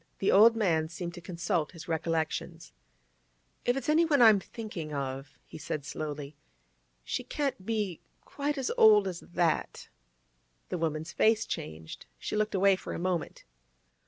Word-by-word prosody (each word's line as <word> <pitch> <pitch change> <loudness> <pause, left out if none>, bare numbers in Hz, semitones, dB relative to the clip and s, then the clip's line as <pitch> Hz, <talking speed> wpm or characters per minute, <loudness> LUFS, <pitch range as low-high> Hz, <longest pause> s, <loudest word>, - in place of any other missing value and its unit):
The 195 - +1
old 225 +4 +7
man 165 -8 +1
seemed 175 +1 -6
to 175 - -9
consult 170 -2 -2
his 165 - -10
recollections. 165 0 -2 0.9
'If 245 +2 +2
it's 270 - -4
anyone 310 -1 +4
I'm 220 -4 +7
thinking 190 -6 -7
of,' 135 +1 -5
he - - -11
said 150 -1 -4
slowly, 145 -1 -5 0.7
'she - - -3
can't 275 -9 -2
be 210 -7 -2 0.2
quite 290 +1 -3
as 265 -2 -1
old 210 -2 +7
as 180 -2 -4
that.' 175 -2 -1 0.8
The 180 - -3
woman's 160 0 -2
face 220 0 +3
changed; 80 -2 -7
she - - -4
looked 215 -1 0
away 195 0 +5
for - - -7
a - - -3
moment. 180 -1 -2
175 Hz, 150 wpm, -29 LUFS, 160-215 Hz, 0.9 s, old